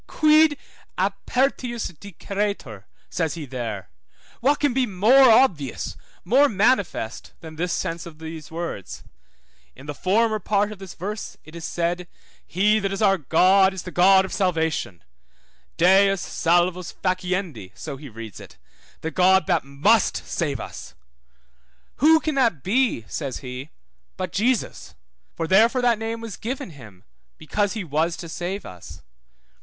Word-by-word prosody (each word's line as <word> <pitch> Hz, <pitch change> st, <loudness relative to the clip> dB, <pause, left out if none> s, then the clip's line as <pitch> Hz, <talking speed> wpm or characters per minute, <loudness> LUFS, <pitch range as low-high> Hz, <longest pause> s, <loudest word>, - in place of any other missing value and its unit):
Quid 310 Hz, -1 st, +4 dB, 0.4 s
apertius 245 Hz, -3 st, -1 dB
diceretur? 195 Hz, -, -5 dB, 0.3 s
says 165 Hz, -2 st, -1 dB
he 160 Hz, -3 st, -6 dB
there, 115 Hz, -7 st, -6 dB, 0.5 s
what 280 Hz, +5 st, +2 dB
can 290 Hz, -4 st, +1 dB
be 255 Hz, -1 st, +1 dB
more 235 Hz, +7 st, +5 dB
obvious, 175 Hz, -, +2 dB, 0.3 s
more 270 Hz, +9 st, +4 dB
manifest 200 Hz, -, 0 dB
than 160 Hz, -2 st, -10 dB
this 175 Hz, +2 st, -2 dB
sense 165 Hz, 0 st, -3 dB
of 160 Hz, -2 st, -12 dB
these 160 Hz, -1 st, -8 dB
words? 165 Hz, -, -6 dB, 0.7 s
In 135 Hz, -, -13 dB
the 145 Hz, -, -5 dB
former 215 Hz, +7 st, +1 dB
part 205 Hz, 0 st, 0 dB
of 210 Hz, -, -9 dB
this 190 Hz, -2 st, -10 dB
verse 210 Hz, +5 st, -6 dB
it 155 Hz, +2 st, -13 dB
is 165 Hz, -1 st, -7 dB
said, 175 Hz, +1 st, -2 dB, 0.4 s
He 210 Hz, +4 st, +2 dB
that 195 Hz, -1 st, -2 dB
is 195 Hz, +2 st, -2 dB
our 195 Hz, -2 st, +4 dB
God 190 Hz, +6 st, +4 dB
is 185 Hz, -, -6 dB
the 180 Hz, -, -7 dB
God 190 Hz, +2 st, +5 dB
of -, -, -7 dB
salvation; 160 Hz, -, -1 dB, 0.7 s
Deus 195 Hz, +3 st, +5 dB
salvos 175 Hz, +1 st, 0 dB
faciendi, 180 Hz, -, -3 dB
so 150 Hz, -3 st, -6 dB
he 145 Hz, 0 st, -10 dB
reads 110 Hz, -3 st, -9 dB
it, -, -, -13 dB, 0.4 s
the 160 Hz, -, -3 dB
God 190 Hz, +2 st, +4 dB
that 175 Hz, -4 st, +1 dB
must 140 Hz, +12 st, +2 dB
save 145 Hz, -7 st, -2 dB
us. 65 Hz, -, -9 dB, 1.0 s
Who 320 Hz, +3 st, +6 dB
can 310 Hz, -1 st, -2 dB
that 235 Hz, -, +1 dB
be, 220 Hz, -, +1 dB
says 135 Hz, -, -4 dB
he, 125 Hz, +3 st, -7 dB, 0.5 s
but 185 Hz, 0 st, -4 dB
Jesus? 240 Hz, +4 st, -1 dB, 0.4 s
For 165 Hz, -, -2 dB
therefore 225 Hz, +8 st, +4 dB
that 235 Hz, -3 st, +3 dB
name 225 Hz, +1 st, -4 dB
was 225 Hz, -5 st, -7 dB
given 240 Hz, -5 st, -5 dB
him 110 Hz, -, -14 dB, 0.3 s
because 205 Hz, +6 st, -1 dB
he 220 Hz, -4 st, -4 dB
was 160 Hz, +1 st, -1 dB
to 170 Hz, -, -8 dB
save 180 Hz, +4 st, -5 dB
us. 90 Hz, -2 st, -11 dB
185 Hz, 150 wpm, -23 LUFS, 160-215 Hz, 1.0 s, Who